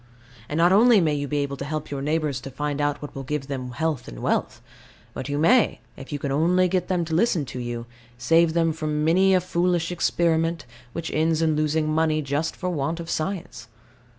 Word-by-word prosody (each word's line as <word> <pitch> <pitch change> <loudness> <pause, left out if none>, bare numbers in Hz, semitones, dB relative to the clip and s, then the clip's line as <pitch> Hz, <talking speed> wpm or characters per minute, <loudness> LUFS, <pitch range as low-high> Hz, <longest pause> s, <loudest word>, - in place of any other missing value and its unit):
And 150 - -2
not 170 +2 +4
only 225 +3 +6
may 160 -4 +2
you 145 -1 -2
be 150 - -2
able 140 0 -4
to 140 - -5
help 155 +1 -4
your 140 -1 -3
neighbours 150 -3 -1
to 135 - -7
find 145 +2 -3
out 145 0 -1
what 145 - -7
will 135 - -6
give 135 +1 -3
them 130 -2 -5
health 155 -2 -2
and - - -9
wealth: - - -1 0.5
but 130 - -6
you 145 - -1
may, 220 +10 +3 0.2
if 135 - -11
you 145 - -2
can 140 -1 -3
only 175 +6 +3
get 180 0 -1
them 180 -2 0
to 160 - -5
listen 175 -4 +2
to 125 - -7
you, 120 -1 -4 0.3
save 165 +6 +3
them 165 -1 +2
from 150 -1 -2
many 190 +4 +4
a - - +4
foolish 175 -1 0
experiment, 165 -2 0 0.3
which 165 0 -4
ends 160 +1 +1
in 155 -1 +2
losing 155 +1 +1
money 155 0 +1
just 145 +4 -2
for 180 -1 -3
want 160 +1 -2
of 170 0 -5
science. 155 - -4
155 Hz, 215 wpm, -24 LUFS, 145-170 Hz, 0.5 s, only